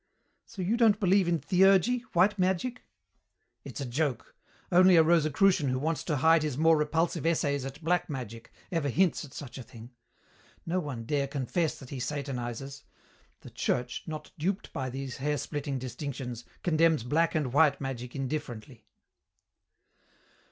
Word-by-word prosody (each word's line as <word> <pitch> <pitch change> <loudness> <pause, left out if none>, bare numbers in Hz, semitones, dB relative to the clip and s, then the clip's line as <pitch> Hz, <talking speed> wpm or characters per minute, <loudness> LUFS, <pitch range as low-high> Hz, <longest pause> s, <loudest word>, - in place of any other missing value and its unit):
"So 200 -5 -6
you 215 +6 +1
don't 220 -3 +4
believe 190 -1 +3
in 170 -1 +2
theurgy, 190 - +4
white 195 +4 +3
magic?" 190 +7 0 0.8
"It's - - -8
a 140 - -3
joke. 125 -1 -2 0.4
Only 185 +1 +6
a 165 - +7
Rosicrucian 165 0 +3
who 130 - 0
wants 155 +2 -1
to 155 - 0
hide 160 +3 +5
his 150 -4 -2
more 160 +1 +5
repulsive 160 +2 0
essays 145 -4 0
at 135 +4 -8
black 175 +2 +1
magic 115 -5 -7 0.2
ever 165 -5 0
hints 175 +6 +2
at 145 - -11
such 135 -1 -8
a - - -7
thing. 115 +1 -13 0.7
No 175 +2 0
one 135 -9 -5
dare 140 +2 0
confess 145 +4 -1
that 130 - -12
he 135 - -5
satanizes. 135 -1 -4 0.6
The - - -12
Church, 125 0 -2
not 155 -1 -7
duped 190 +6 -2
by 130 -1 -3
these 135 0 -6
hair 150 +2 -1
splitting 145 -2 -3
distinctions, 130 -2 -6 0.2
condemns 160 -5 +3
black 165 +8 +1
and 140 -6 -1
white 145 -1 +4
magic 125 -3 -5
indifferently." 130 -4 -5
150 Hz, 155 wpm, -29 LUFS, 130-170 Hz, 0.8 s, a